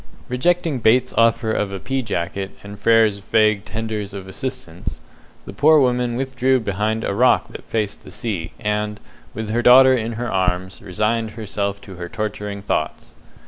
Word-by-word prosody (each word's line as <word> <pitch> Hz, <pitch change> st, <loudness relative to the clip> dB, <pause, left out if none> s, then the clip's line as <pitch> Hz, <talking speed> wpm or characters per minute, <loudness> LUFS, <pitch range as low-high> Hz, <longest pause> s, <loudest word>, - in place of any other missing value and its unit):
Rejecting 160 Hz, +3 st, +1 dB
Bates's 125 Hz, +3 st, +3 dB
offer 115 Hz, 0 st, +3 dB
of 105 Hz, -2 st, -1 dB
a 95 Hz, -, -5 dB
pea 135 Hz, +6 st, -2 dB
jacket 95 Hz, -3 st, -3 dB
and 100 Hz, 0 st, -10 dB
Frere's 115 Hz, -2 st, +4 dB
vague 105 Hz, 0 st, +2 dB
tenders 110 Hz, -2 st, -4 dB
of 95 Hz, -1 st, -7 dB
assistance, 95 Hz, -, -6 dB, 0.5 s
the 100 Hz, -, -8 dB
poor 150 Hz, +8 st, +5 dB
woman 125 Hz, -2 st, +1 dB
withdrew 130 Hz, 0 st, +1 dB
behind 110 Hz, +1 st, -1 dB
a -, -, -1 dB
rock 125 Hz, +5 st, +3 dB
that -, -, -10 dB
faced 105 Hz, -2 st, -2 dB
the -, -, -12 dB
sea, 95 Hz, -8 st, -4 dB
and, 105 Hz, -1 st, -2 dB, 0.4 s
with 110 Hz, 0 st, -4 dB
her 120 Hz, +2 st, +1 dB
daughter 130 Hz, +2 st, +8 dB
in 115 Hz, -1 st, -2 dB
her 120 Hz, +2 st, -3 dB
arms, 95 Hz, 0 st, -1 dB
resigned 110 Hz, +3 st, -1 dB
herself 100 Hz, -2 st, -3 dB
to 95 Hz, -3 st, -11 dB
her 85 Hz, 0 st, -6 dB
torturing 105 Hz, -1 st, -4 dB
thoughts. 80 Hz, -6 st, -2 dB
110 Hz, 165 wpm, -21 LUFS, 100-120 Hz, 0.5 s, daughter